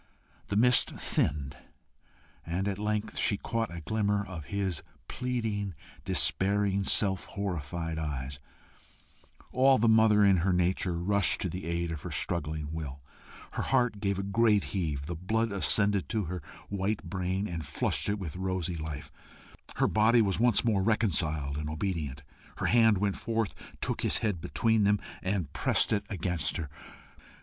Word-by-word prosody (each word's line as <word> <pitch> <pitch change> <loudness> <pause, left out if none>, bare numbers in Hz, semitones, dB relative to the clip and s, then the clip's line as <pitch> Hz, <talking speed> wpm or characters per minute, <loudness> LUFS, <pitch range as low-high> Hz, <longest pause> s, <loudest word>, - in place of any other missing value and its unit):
The 100 - -2
mist 125 +3 +5
thinned, 70 -2 -1 0.9
and 90 +4 -2
at 100 -1 -2
length 105 0 -2
she 100 - +2
caught 115 -1 -2
a 85 -1 -6
glimmer 100 +3 0
of 85 -6 -8
his 95 -5 -2 0.3
pleading, 110 -7 -2 0.3
despairing, 100 0 +3
self 95 -2 +3
horrified 85 -4 -4
eyes: 70 -3 -4 1.1
all 130 +1 +5
the 115 - +2
mother 110 -2 +5
in 95 -2 +5
her 90 +3 +1
nature 90 0 +1
rushed 95 0 +2
to 95 - -1
the 90 +3 -6
aid 85 0 -1
of 80 -3 -5
her - - -6
struggling 75 -2 -2
will; 70 -4 -6 0.5
her - - -3
heart 120 -5 +1
gave 100 -2 0
a 100 - -2
great 105 0 +3
heave; 75 -8 -2
the 85 - -4
blood 110 +7 -1
ascended 100 0 +2
to 110 -2 0
her 90 +1 -5 0.3
white 100 +1 -1
brain, 95 +3 -2
and 80 -4 -5
flushed - - -1
it 100 - 0
with 90 -6 -6
rosy 95 -2 -2
life; 75 -2 -6 0.6
her - - +2
body 110 +2 +4
was 95 -2 0
once 120 -1 +3
more 105 -4 +2
reconciled 80 -9 +1
and 75 0 -4
obedient; 75 -4 -3 0.3
her - - -2
hand 115 -3 +5
went 100 0 0
forth, 115 -3 -1 0.3
took - - -2
his - - +1
head 100 -6 -1
between 110 +11 +1
them, 105 0 +3 0.2
and 95 -6 -2
pressed - - +2
it 105 -1 0
against 90 -5 -2
her. 80 -4 -4
95 Hz, 160 wpm, -29 LUFS, 80-105 Hz, 1.1 s, mist